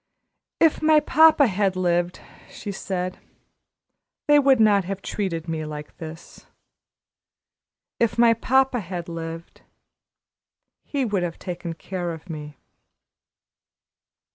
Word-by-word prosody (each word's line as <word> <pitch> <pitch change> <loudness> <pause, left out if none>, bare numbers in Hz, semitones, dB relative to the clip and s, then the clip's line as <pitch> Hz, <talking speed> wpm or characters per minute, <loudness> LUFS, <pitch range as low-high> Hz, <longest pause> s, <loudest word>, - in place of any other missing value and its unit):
"If 325 -2 +3
my 310 0 +5
papa 305 0 +5
had 195 -3 0
lived," 175 -1 0 0.3
she 205 - -7
said, 185 -2 -4 1.1
"they 295 0 +6
would 270 -3 +4
not 205 -3 +4
have 195 +1 -5
treated 170 -5 -3
me 160 -1 -3
like 150 -1 -8
this. 160 +1 -11 1.5
If 230 0 +1
my 235 -1 +6
papa 260 +2 +2
had 180 -3 -6
lived, 165 0 -7 1.2
he 275 -3 -2
would 205 -5 -1
have 170 -2 -3
taken 175 -2 -6
care 175 +1 -5
of 165 +2 -10
me." 150 -2 -8
185 Hz, 115 wpm, -23 LUFS, 170-235 Hz, 1.5 s, they